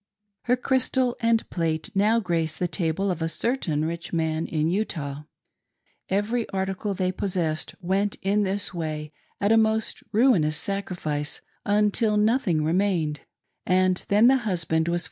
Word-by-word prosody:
Her 250 - +3
crystal 255 0 +1
and 230 -1 +2
plate 165 +3 -2
now 210 +3 +3
grace 165 -5 -1
the 180 - 0
table 180 +2 -1
of 170 -2 -4
a 165 - 0
certain 165 - -1
rich 170 +1 -4
man 160 -1 -1
in 155 -1 0
Utah. 155 -7 -3 0.8
Every 215 +4 0
article 195 +1 -2
they 185 0 0
possessed 175 -5 -2
went 195 +3 0
in 200 +2 +2
this 200 0 0
way 155 -3 -4 0.3
at 200 +2 +2
a 225 - +6
most 220 0 +1
ruinous 200 - +3
sacrifice, 175 -7 -3 0.3
until 210 +1 +3
nothing 210 - +2
remained, 165 -3 +1 0.4
and 185 0 +2
then 210 +3 +4
the 265 +2 +6
husband 170 -8 -1
was. 170 0 +1
185 Hz, 145 wpm, -25 LUFS, 160-210 Hz, 0.8 s, a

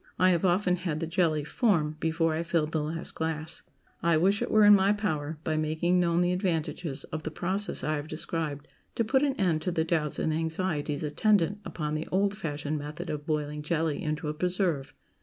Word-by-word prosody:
I 185 0 +5
have 170 0 +1
often 180 0 +2
had 170 -4 -2
the 165 - -1
jelly 165 -2 +1
"form" 155 - +1
before 165 0 +1
I 160 - -1
filled 165 -2 0
the 160 - 0
last 160 +2 -3
glass. 160 -1 -3 0.4
I 170 -1 +3
wish 195 +5 +3
it - - -1
were 215 -1 +5
in 205 - +9
my 195 0 +5
power, 160 -8 -2
by 155 -1 0
making 160 +3 +1
known 170 -1 +2
the 180 0 +2
advantages 170 -5 -1
of 155 - -2
the 155 - -4
process 185 +2 -1
I 155 +2 0
have 145 +1 -5
described, 155 -2 -3 0.3
to 230 - +2
put 265 +4 +2
an 280 -2 +1
end 170 -5 +2
to 180 - -1
the 165 -2 +1
doubts 160 -3 0
and 160 - 0
anxieties 160 -2 -1
attendant 200 +4 +2
upon 150 -2 -4
the 155 +1 -3
old 200 +2 +2
fashioned 150 -5 -3
method 150 +1 -6
of 150 0 -5
boiling 150 -1 -1
jelly 160 -1 -1
into 155 +1 -2
a 150 - -1
preserve. 175 -4 -1
160 Hz, 205 wpm, -28 LUFS, 155-180 Hz, 0.4 s, in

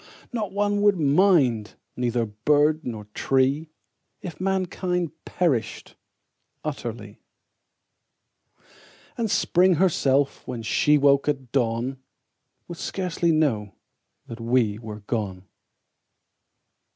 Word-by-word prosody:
Not 215 -5 -2
one 205 0 0
would 205 -2 +4
mind, 140 - +3 0.2
neither 120 -1 0
bird 145 +9 +2
nor 110 -3 -5
tree 135 +4 +1 0.5
If 170 -2 -8
mankind 185 -2 -1
perished 135 - -1 0.7
utterly; 115 -8 -6 2.0
And 230 -2 -1
Spring 185 -1 +3
herself, 145 -6 +2
when 120 -3 -5
she 150 +7 +3
woke 140 0 +3
at 135 -4 -3
dawn, 125 +1 -1 0.7
Would 170 -1 -8
scarcely 175 -3 -1
know 115 - 0 0.5
that 115 - -9
we 115 -3 +1
were 105 -2 -8
gone. 100 -4 -4
140 Hz, 95 wpm, -24 LUFS, 115-175 Hz, 2.0 s, would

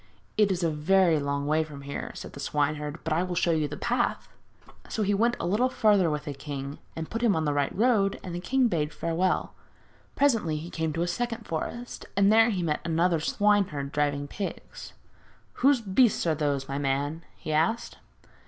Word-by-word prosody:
'It 210 -2 +3
is 180 -1 -1
a 165 - +2
very 165 +2 +3
long 140 0 -2
way 155 +2 +2
from 145 -3 -10
here,' 140 0 -5
said - - -8
the - - -9
swineherd; 150 +1 -1
'but 160 - -1
I 165 - +2
will 180 -1 -2
show 175 -1 +2
you 155 -2 +1
the 145 +1 -7
path.' 240 0 -1 0.6
So 220 - -1
he 205 0 +1
went 235 +4 +2
a - - -2
little 215 +8 +2
farther 210 -8 +3
with 150 -1 -3
the 145 - -4
king 140 0 -6 0.2
and 160 -1 -4
put 230 - -4
him 230 -4 +3
on 160 -1 0
the 145 - +1
right 145 -1 0
road, 210 -4 +2
and 180 - -6
the 175 - -3
king 260 +7 +2
bade 160 -8 0
him - - -16
farewell. 175 +2 0 0.6
Presently 225 - +2
he 165 +3 -7
came 160 -1 -1
to 165 +2 0
a - - -1
second 230 +5 -3
forest, 235 +9 -5
and 200 +1 +5
there 225 +1 +6
he 190 -5 -1
met 150 -3 -1
another 170 0 +2
swineherd 185 -6 +1
driving 145 -1 0
pigs. 195 +6 -7 0.6
'Whose 270 -2 +3
beasts 210 +1 +3
are 165 - +3
those, 145 -3 -1
my 140 +1 -3
man?' 145 +4 -1
he 155 - -4
asked. 165 +10 0
170 Hz, 205 wpm, -27 LUFS, 150-205 Hz, 0.6 s, there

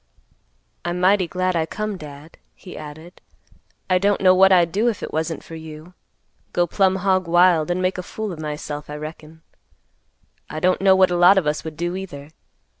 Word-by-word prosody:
"I'm 175 +1 -3
mighty 185 0 +3
glad 185 +1 -1
I 160 -1 0
come, 215 +2 -4
Dad," 150 -1 -12 0.2
he 185 - -12
added; 155 +3 -11 0.7
"I 185 -1 +2
don't 200 +1 +1
know 185 -1 +5
what 190 +1 +5
I'd 175 -3 +4
do 215 +6 +1
if 225 - -5
it - - -6
wasn't 160 +1 -3
for - - -12
you; 160 +1 -10 0.6
go 175 - +2
plumb 190 +2 +1
hog 185 -1 0
wild, 175 -1 +4
and 180 +1 -1
make 185 0 -1
a - - -2
fool 210 +2 -6
of 160 - -10
myself, 150 -1 -6
I 150 - -6
reckon. 155 +1 -10 1.1
I 155 - -5
don't 185 +3 +1
know 190 -1 +5
what 185 -1 +4
a - - 0
lot 175 +3 +6
of 190 - +2
us 150 0 -1
would 160 -1 -8
do, 175 +1 -2
either. 155 -6 -8
175 Hz, 195 wpm, -21 LUFS, 155-185 Hz, 1.1 s, lot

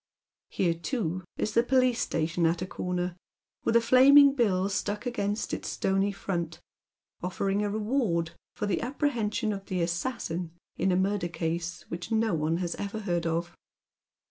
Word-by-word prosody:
Here, 175 -3 +1
too, 185 - -3
is 215 - -1
the 235 - +5
police 255 -1 +2
etation 165 +1 +1
at 170 +2 -1
a - - -2
corner, 180 -1 -3 0.5
with 230 - +1
a 235 - +7
flaming 275 +4 +7
bill 200 -8 +2
stuck 205 +3 -2
against 210 -3 -2
its - - -3
stony 195 +1 +1
front, 170 -4 -3 0.6
offering 195 +3 -1
a 205 - 0
reward 210 -6 0 0.2
for - - -2
the 205 - 0
apprehension 240 -4 -1
of 195 -1 -6
tlie 180 -3 -1
assassin 170 -2 -3 0.2
in 190 - +1
a - - +3
murder 190 0 +1
case 170 0 -3
which 175 +5 -6
no 220 -2 +2
one 160 +1 +1
has 175 -1 -2
ever 205 +2 -4
heard 175 -4 -1
of. 170 +1 -2
195 Hz, 160 wpm, -28 LUFS, 170-225 Hz, 0.6 s, a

